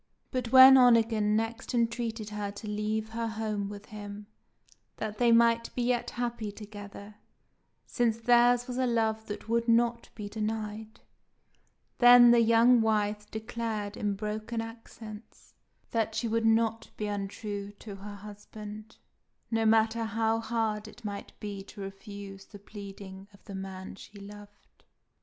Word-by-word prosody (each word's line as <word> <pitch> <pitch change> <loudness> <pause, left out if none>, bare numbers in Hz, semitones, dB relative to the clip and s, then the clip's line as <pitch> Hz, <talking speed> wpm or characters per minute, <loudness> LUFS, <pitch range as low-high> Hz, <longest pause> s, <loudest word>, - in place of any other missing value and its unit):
But 250 -3 -3
when 265 0 +10
Onegin 225 -4 +4
next 225 +2 -2
entreated 230 -2 -1
her 210 -1 -3
to 210 +1 -9
leave 215 +1 -2
her 230 +1 -3
home 215 -2 -3
with 205 0 -9
him, 205 0 -8 0.7
that 215 -1 -5
they 240 -1 +4
might 230 0 +4
be 245 - -1
yet 240 0 0
happy 235 -3 -3
together, 205 0 -10 0.7
since 235 -3 0
theirs 240 +1 +4
was 250 -1 -5
a 255 - +2
love 220 -2 0
that 205 +1 -7
would 230 +1 0
not 235 0 +2
be 210 -2 -6
denied, 215 0 -5 1.0
then 245 -1 +9
the 240 - +6
young 230 +1 +5
wife 210 -1 0
declared 220 -2 -4
in 205 -1 -1
broken 215 +3 -4
accents 225 -1 -10 0.4
that 225 -1 -1
she 225 +1 -1
would 225 0 +1
not 225 0 +1
be 210 - -3
untrue 205 0 -4
to 205 -1 -10
her 205 +1 -9
husband, 210 +1 -10 0.5
no 225 -1 +2
matter 225 +1 +3
how 225 +1 0
hard 220 -2 -2
it 230 +1 -14
might 200 -1 -7
be 205 -2 -6
to 205 - -13
refuse 195 0 -9
the 205 - -12
pleading 200 -1 -10
of - - -24
the 200 - -9
man 190 -1 -7
she 200 +1 -13
loved. 205 +1 -14
220 Hz, 145 wpm, -29 LUFS, 205-230 Hz, 1.0 s, when